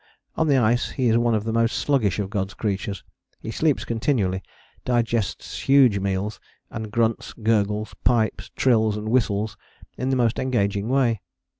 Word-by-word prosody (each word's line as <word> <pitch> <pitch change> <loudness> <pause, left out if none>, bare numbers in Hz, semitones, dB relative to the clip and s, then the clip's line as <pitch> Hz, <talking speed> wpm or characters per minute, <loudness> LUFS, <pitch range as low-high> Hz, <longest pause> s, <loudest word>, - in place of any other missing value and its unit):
On 160 - +1
the 140 -2 +4
ice 120 0 +2
he 130 -4 0
is 115 - +4
one 120 -1 +2
of 105 - -1
the 110 0 -2
most 115 +1 +1
sluggish 120 - +1
of 100 -2 -3
God's 100 -1 -2
creatures, 100 -1 -3 0.4
he 110 - -6
sleeps 155 +3 +1
continually, 110 -6 0 0.4
digests 115 -5 -1
huge 130 -7 +6
meals, 100 +2 -2 0.3
and 110 -2 -6
grunts, 115 -1 0
gurgles, 110 -2 0
pipes, 115 -3 +1
trills 110 -4 +2
and 105 +1 -4
whistles 110 -3 0 0.4
in 130 +2 -1
the 135 - +2
most 120 -2 +1
engaging 100 -4 0
way. 125 -5 +2
110 Hz, 160 wpm, -23 LUFS, 105-120 Hz, 0.4 s, huge